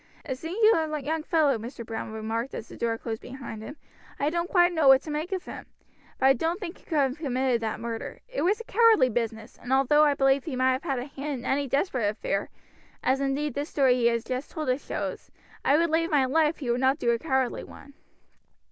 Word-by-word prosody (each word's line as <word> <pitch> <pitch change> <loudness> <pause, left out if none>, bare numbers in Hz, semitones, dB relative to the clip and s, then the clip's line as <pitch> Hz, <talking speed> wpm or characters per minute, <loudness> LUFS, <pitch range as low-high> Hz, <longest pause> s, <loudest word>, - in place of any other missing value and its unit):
"A 270 - -2
singular 325 - +2
young 305 +3 -2
fellow!" 305 -6 +2
Major 235 +1 -8
Browne 225 0 -5
remarked 225 +3 -3
as 225 - -6
the - - -11
door 230 -1 -1
closed 225 -1 -5
behind 250 -4 -8
him. 285 +7 -9 0.4
"I 290 +2 +1
don't 340 +1 -1
quite 350 -1 +4
know 320 -4 +2
what 265 0 +7
to 310 - -6
make 310 +5 -3
of 375 -2 -3
him, - - -9 0.5
but - - 0
I 270 - +7
don't 325 - -1
think 360 -4 -7
he - - -25
could 320 - -2
have 270 0 +1
committed 260 -4 0
that 220 -1 -3
murder. 230 -1 -5
It - - -4
was 400 +5 +2
a - - -6
cowardly 450 - +4
business, 225 -1 -4
and 245 - -7
although 275 +3 +4
I 290 -2 +3
believe 270 0 +3
he 305 -6 -4
might 255 +1 +1
have 275 -6 -1
a 245 - -3
hand 280 -1 -5
in - - -11
any 280 +1 0
desperate 260 - 0
affair, 205 -1 -2 0.5
as 265 +1 +2
indeed 275 +1 -1
this 285 +3 -3
story 270 -3 +3
he 245 -1 +2
has 235 -1 +1
just 255 +3 -4
told 310 -5 -4
us 255 +3 0
shows, - - -5 0.3
I 285 - +4
would 335 0 +1
lay 330 +1 +2
my 290 -5 +3
life 310 +4 +2
he 255 -5 -2
would 245 +2 0
not 265 +2 +3
do 240 -6 +1
a 235 - 0
cowardly 265 -4 0
one." 280 - -13
270 Hz, 230 wpm, -27 LUFS, 245-310 Hz, 0.5 s, what